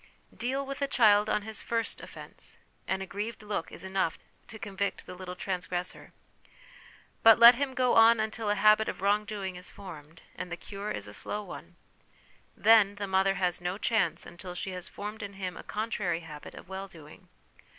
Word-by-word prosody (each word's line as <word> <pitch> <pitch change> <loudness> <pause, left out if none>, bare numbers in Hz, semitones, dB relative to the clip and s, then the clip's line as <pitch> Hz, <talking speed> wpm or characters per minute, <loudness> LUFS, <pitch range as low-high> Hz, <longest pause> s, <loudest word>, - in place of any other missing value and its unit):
Deal 265 +3 -2
with 275 +1 -6
a 280 - +2
child 215 -6 +5
on 210 - +1
\\isfirst 225 +1 -2
offence, - - -6 0.3
and 190 0 -1
a - - -5
grieved 210 +4 -5
look 205 -5 -3
is - - -8
enough 190 -3 0 0.3
to 220 - -8
convict 200 -1 -3
the - - -8
little 180 0 -7
transgressor; 180 -1 -4 1.1
but 225 -1 +8
let 235 +1 +11
him 265 +1 -2
go 250 -1 +3
on 225 0 +7
until 220 0 -2
a 205 - +3
habit 215 +2 +5
of - - -6
wrong 205 +1 +3
doing 200 -3 -4
is 180 +1 -6
formed, 165 -4 -11
and 180 0 -6
the 175 - -3
cure 200 +2 -6
is 105 - -3
a 105 - -10
slow 210 - -3
one; - - -10 0.8
then 215 -3 +6
the 205 0 -3
mother 195 0 +2
has 180 -1 0
no 180 +2 -2
chance 215 -7 +1
until 180 +1 -9
she 190 - -4
has 180 0 -4
formed 210 +2 -7
in 200 0 -6
him 185 -2 -5
a - - -8
contrary 205 -6 -2
habit 150 -3 -10
of - - -11
well 190 +1 -5
doing. 170 +1 -14
200 Hz, 190 wpm, -29 LUFS, 180-220 Hz, 1.1 s, let